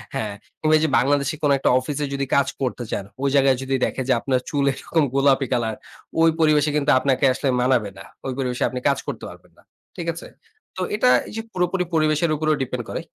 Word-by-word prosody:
হ্যাঁ, 105 -2 -2 0.3
কিংবা 155 0 +2
এইযে 160 -1 +1
বাংলাদেশে 140 +2 +1
কোন 145 - +3
একটা - - +1
অফিসে 145 +3 -3
যদি 140 0 -1
কাজ 140 - +3
করতে 125 -2 -2
চান, - - -2 0.2
ওই 140 - +2
জায়গায় 135 -2 +4
যদি 135 0 -1
দেখে 130 - -3
যে, - - +5
আপনার 130 +1 0
চুল 145 -2 0
এরকম 160 +3 0
গোলাপি 135 -1 +3
কালার 115 -3 -1 0.5
ওই 165 - +6
পরিবেশে 150 -1 +3
কিন্তু 150 -1 +2
আপনাকে 135 0 +1
আসলে 135 +1 -1
মানাবে 125 -5 +2
না। 95 - -10 0.2
ওই 130 - -2
পরিবেশে 125 -2 -2
আপনি 125 +1 -4
কাজ 140 - +2
করতে - - -5
পারবেন - - -15
না। - - -22 0.3
ঠিক 170 - -5
আছে? 165 - -9 0.5
তো - - -3
এটা 250 +4 +3 0.2
এই - - -10
যে, 225 - -2
পুরোপুরি 180 0 0
পরিবেশের 155 0 +2
উপরেও 155 0 +1
ডিপেন্ড 125 -2 -4
করে। - - -4
140 Hz, 210 wpm, -22 LUFS, 130-155 Hz, 0.5 s, ওই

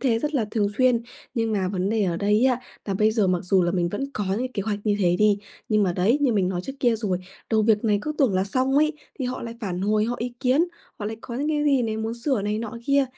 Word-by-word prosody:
thế 235 -4 +2
rất 300 +5 -2
là 245 -6 +2
thường 215 -3 +1
xuyên. 250 -2 +4 0.3
Nhưng 225 -2 0
mà 190 -3 0
vấn 190 0 -1
đề 220 -2 +2
ở 175 -2 0
đây 210 +5 +2
á, 255 -1 +2 0.2
là 195 - -2
bây 215 +3 +3
giờ 215 -3 +2
mặc 180 -1 +1
dù 185 0 +3
là 175 - +1
mình 175 -2 +1
vẫn 205 +9 -3
có 205 - -2
những 255 +1 -3
kế 200 - -2
hoạch 210 -1 -2
như 210 -2 +2
thế 175 -2 +3
đi, 210 -1 +4 0.3
nhưng 215 -1 +3
mà 185 -3 +2
đấy, 210 +11 +2
như 275 -4 +3
mình 195 -4 +2
nói 180 -2 -2
trước 270 - -5
kia 240 -3 +3
rồi, 200 -5 -1 0.3
đầu 220 -1 +3
việc 215 0 +3
này 210 -2 +3
cứ 305 - -2
tưởng 260 -9 +3
là 185 +1 +2
xong 260 +6 0
ấy, 305 +1 +4 0.3
thì 260 - -2
họ 250 +1 -3
lại 230 0 -6
phản 185 -4 -3
hồi, 210 +2 +2
họ 240 - -1
ý 240 +1 -3
kiến, 265 +5 +3 0.3
họ 205 - -5
lại 220 - -4
có 235 - -7
những 285 +5 -1
cái 300 -1 +1
gì 275 -4 +3
này, 220 -2 -1
muốn 220 +1 -3
sửa 235 -2 -1
này 210 +1 -1
nọ 230 0 -5
kia. 280 0 +4
220 Hz, 290 wpm, -24 LUFS, 200-250 Hz, 0.3 s, xuyên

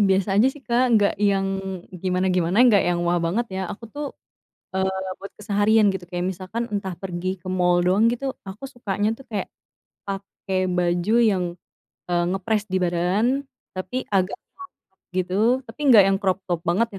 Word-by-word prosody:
biasa 190 +1 +2
aja 240 - +6
sih 295 - -15
Kak 245 +1 +3
nggak 205 -1 +3 0.2
yang 195 -1 +1 0.6
gimana-gimana, 185 -1 +1
nggak 205 -5 +5
yang 175 -1 +1
wah 175 0 +2
banget 225 +8 0
ya, - - -2
aku 230 - -10
tuh, 295 0 -3 0.7
eee, 190 0 -1
buat 200 - -9
keseharian 210 +1 +3
gitu, 190 -2 -5
kayak 175 0 -2
misalkan 190 +6 -4
entah 195 -2 -2
pergi 180 -1 -4
ke - - -10
mall 180 -1 +3
doang 195 +5 +4
gitu. 245 +3 -4 0.2
Aku 210 +7 -10
sukanya 205 -3 -1
tuh 270 - -13
kayak, 205 - -2 0.6
pakai 195 -1 -4 0.2
baju 175 +3 +1 0.2
yang, 185 -2 0 0.6
e 175 - -3 0.2
ngepress 205 +3 0
di - - +2
badan 180 +5 +1 0.5
tapi 185 +5 -5 0.2
agak 185 0 +2
crop 375 0 -14 0.2
top 190 - -45 0.2
gitu, 185 -1 -1 0.3
tapi 225 +6 -13
enggak 220 -6 +9
yang 195 0 +3
crop 190 -1 +2
top 175 -2 -1
banget 220 +7 +2
195 Hz, 170 wpm, -23 LUFS, 180-215 Hz, 0.7 s, enggak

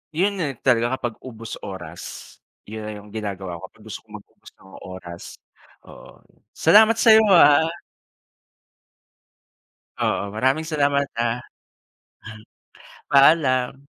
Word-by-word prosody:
yun 195 +3 0
nga 160 - -1 0.2
talaga 120 0 +2
kapag 120 -3 -5
ubos 115 -3 -9
oras. 90 -5 -9 0.6
Yun 110 +1 -8
na - - -5
yung 105 0 -12
ginagawa 95 -5 -6
ko - - -9
kapag 110 - -23
gusto - - -6
kong 105 - -12
mag-ubos - - -20
ng 95 - -20
oras, 90 -2 -10 0.6
oo. - - -16 0.3
Salamat 220 +2 +5
sa'yo, 220 -2 +5
ah. 150 0 +6 2.3
Oo, 100 - -1
maraming 135 +7 0
salamat, 140 -2 0
ah. 115 +1 -1 1.7
Paalam. 135 -3 +4
125 Hz, 110 wpm, -22 LUFS, 105-150 Hz, 2.3 s, ah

